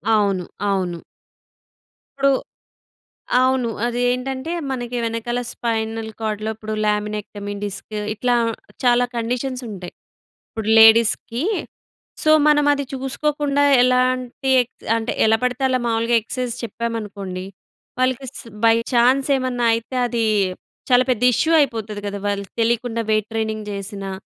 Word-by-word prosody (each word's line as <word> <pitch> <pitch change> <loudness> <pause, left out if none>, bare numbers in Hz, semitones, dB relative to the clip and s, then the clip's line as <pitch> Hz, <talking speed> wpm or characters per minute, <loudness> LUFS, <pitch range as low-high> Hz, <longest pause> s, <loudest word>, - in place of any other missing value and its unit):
అవును. 200 -4 +1 0.2
అవును. 180 -3 -1 1.2
ఇప్పుడు 275 0 +4 1.1
అవును. 255 -2 +2 0.2
అది 240 0 -2
ఏంటంటే, 260 +4 -3 0.2
మనకి 245 -1 -3
వెనకాల 230 +2 -2
స్పైనల్ 225 -1 -2
కార్డ్‌లో 215 0 -2
ఇప్పుడు 215 0 -6
ల్యామినెక్టమీ 210 -1 -2
డిస్కు 205 +1 -6
ఇట్లా 245 +3 +1 0.5
చాలా 245 0 +4
కండిషన్స్ 250 +2 -2
ఉంటయి. 185 -4 -8 0.6
ఇప్పుడు 220 -1 -4
లేడీస్‌కి. 230 +3 +5 0.8
సో, 310 - +5 0.2
మనమది 290 -1 +3
చూసుకోకుండా 285 +2 0 0.2
ఎలాంటి 255 +1 +1
ఎక్ 245 - -8 0.2
అంటే 225 - -2
ఎలా 220 0 +4
పడితే 250 +1 -1
అలా 255 0 +1
మావూలుగా 230 +1 +1
ఎక్ససైజ్ 245 +1 -4
చెప్పామనుకోండి, 205 -5 -4 0.5
వాళ్ళకి 255 +1 0
స్ - - -10 0.2
బై 225 0 +6 0.2
ఛాన్స్ 255 +4 +3
ఏమన్నా 250 -2 0
అయితే, 230 +3 -6
అది 235 -2 0 0.7
చాలా 250 0 +6
పెద్ద 245 -1 -1
ఇష్యూ 315 +8 +1
అయిపోతది 220 -6 -2
గదా! 200 0 -4
వాళ్ళకి 200 -1 -4
తెలియకుండా 230 0 0
వెయిట్ 215 -1 +1
ట్రైనింగ్ 220 -1 -2
చేసినా 195 0 -5
230 Hz, 120 wpm, -21 LUFS, 215-255 Hz, 1.2 s, బై